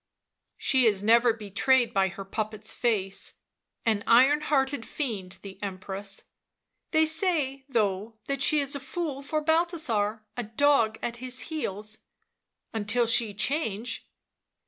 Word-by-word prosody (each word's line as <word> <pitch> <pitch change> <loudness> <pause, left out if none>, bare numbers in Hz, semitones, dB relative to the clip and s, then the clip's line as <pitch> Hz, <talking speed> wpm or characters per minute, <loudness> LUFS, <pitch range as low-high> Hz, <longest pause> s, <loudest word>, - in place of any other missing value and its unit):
" - - -55
She 260 -3 +3
is 205 -2 +2
never 235 +2 +5
betrayed 230 +3 +1
by 195 -2 +3
her 195 +1 -7
puppet's 215 +1 -4
face 195 -5 -1 0.2
— - - -48
an 215 -3 +1
iron 265 +6 +6
hearted 275 -4 0
fiend, 215 - -5
the 195 -1 -10
Empress." 195 0 -5 0.3
" - - -56
They 315 -1 +4
say, 310 -5 +1
though, 215 -2 0
that 275 -1 -2
she 300 +1 +4
is 280 +1 0
a 280 - -2
fool 275 +1 -4
for 305 +2 -2
Balthasar, 300 - 0
a 245 - -2
dog 225 -1 +2
at 235 0 -3
his 255 +1 -1
heels." 215 -7 -4 0.4
" - - -51
Until 225 +2 +1
she 225 -2 +3
change." 225 0 -2
230 Hz, 145 wpm, -27 LUFS, 205-275 Hz, 0.4 s, iron